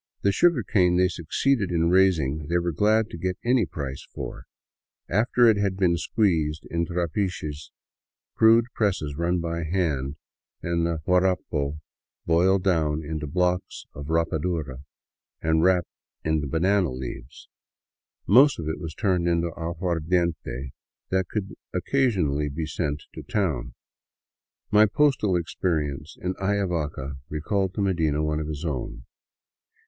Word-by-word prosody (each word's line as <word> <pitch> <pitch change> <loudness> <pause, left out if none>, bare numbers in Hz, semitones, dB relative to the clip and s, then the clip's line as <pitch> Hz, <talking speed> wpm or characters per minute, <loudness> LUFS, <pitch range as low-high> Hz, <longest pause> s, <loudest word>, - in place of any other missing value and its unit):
The 100 - +4
sugarcane 100 - +3
they 90 0 +4
succeeded 100 - 0
in 85 -1 +1
raising 80 -6 +2
they 85 +2 +1
were 85 0 0
glad 105 +6 +2
to 85 - -7
get 90 +1 -2
any 120 -5 +3
price 70 -4 -6
for, - - -6 0.6
after 120 +5 +3
it 110 -2 +5
had 100 -2 0
been 90 -3 +3
squeezed 80 -5 0
in 85 0 0
trapiches, 85 -3 -3 0.6
crude 115 +1 +5
presses 95 -9 -1
run 85 +3 0
by 85 0 -3
hand, 75 -5 -1 0.5
and 85 -1 0
the 80 -2 -2
guarapo 90 -6 +1 0.5
boiled 90 +3 +3
down 80 -4 +1
into 75 0 -4
blocks 90 +3 -1
of 70 0 -8
rapadura 80 -4 -1 0.6
and 80 0 +2
wrapped 90 -1 +3 0.4
in 80 -3 0
banana 90 +3 +2
leaves. 65 0 -8 0.8
Most 135 +8 +6
of 80 - -5
it 80 - -3
was 80 -3 -6
turned 90 -5 +1
into 85 -1 +1
aguardiente 85 -5 -2 0.4
that 95 -1 +1
could 100 -3 -3 0.2
occasionally 90 - +1
be 80 +3 -3
sent 75 -1 -3
to - - -7
town. 95 - -2 1.0
My 110 +1 +6
postal 130 -6 +2
experience 80 -4 -2
in 90 +1 -2
Ayavaca 85 -9 -1
recalled 95 +5 -1
to 105 - -1
Medina 80 -6 +1
one 75 0 0
of 75 - -4
his 75 +1 -5
own. 65 -5 -4
85 Hz, 135 wpm, -25 LUFS, 75-95 Hz, 1.0 s, Most